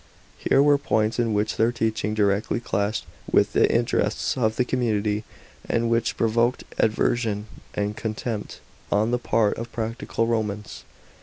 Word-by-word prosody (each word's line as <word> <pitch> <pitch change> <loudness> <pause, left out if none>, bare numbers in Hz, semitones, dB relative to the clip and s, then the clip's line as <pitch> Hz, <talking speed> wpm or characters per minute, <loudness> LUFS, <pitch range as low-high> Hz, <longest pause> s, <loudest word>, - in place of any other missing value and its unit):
Here 140 - +4
were 145 -1 +5
points 110 -5 0
in 115 -2 +1
which 105 +1 0
their 115 +2 +3
teaching 110 -2 -1
directly 105 +2 +1
clashed 105 -2 -1 0.3
with - - +3
the - - +4
interests - - +1
of 110 -4 +1
the 125 - +1
community, 110 -4 0 0.4
and 115 0 +1
which 115 0 +1
provoked 115 +2 +1 0.2
aversion 110 -1 +1 0.3
and 105 +1 -1
con 110 0 -3
tempt 110 -2 -5 0.3
on 105 +3 +2
the 125 - +1
part 110 -3 +1
of 115 0 -6
practical 115 0 -2
Romans. 105 -3 -3
110 Hz, 150 wpm, -24 LUFS, 105-115 Hz, 0.4 s, were